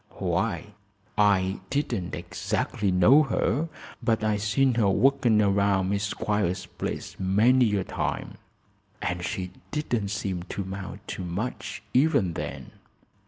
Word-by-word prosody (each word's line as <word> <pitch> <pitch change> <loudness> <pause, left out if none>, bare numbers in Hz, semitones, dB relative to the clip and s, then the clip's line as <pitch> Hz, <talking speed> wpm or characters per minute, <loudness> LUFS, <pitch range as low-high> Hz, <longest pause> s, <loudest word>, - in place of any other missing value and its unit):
"Why, 105 - -1 0.4
I 100 -2 +3
didn't 120 -10 -1
exactly 105 -2 -2
know 90 +12 +6
her, 140 - 0 0.3
but 115 -2 +1
I 105 -1 +2
seen 125 +6 +2
her 110 -4 +3
workin' 120 +2 +3
around 100 -1 +2
Miss 100 0 0
Squiers's 105 -4 -1
place - - -5
many 110 +4 +4
a 95 - 0
time, - - -3 0.6
and 90 0 -2
she 90 0 -3 0.2
didn't 120 -9 -1
seem 95 -2 -2
to 95 +3 -5
'mount 95 0 -7
to - - -4
much, 95 +8 -4
even 130 - +3
then. - - -6
105 Hz, 125 wpm, -26 LUFS, 95-120 Hz, 0.6 s, know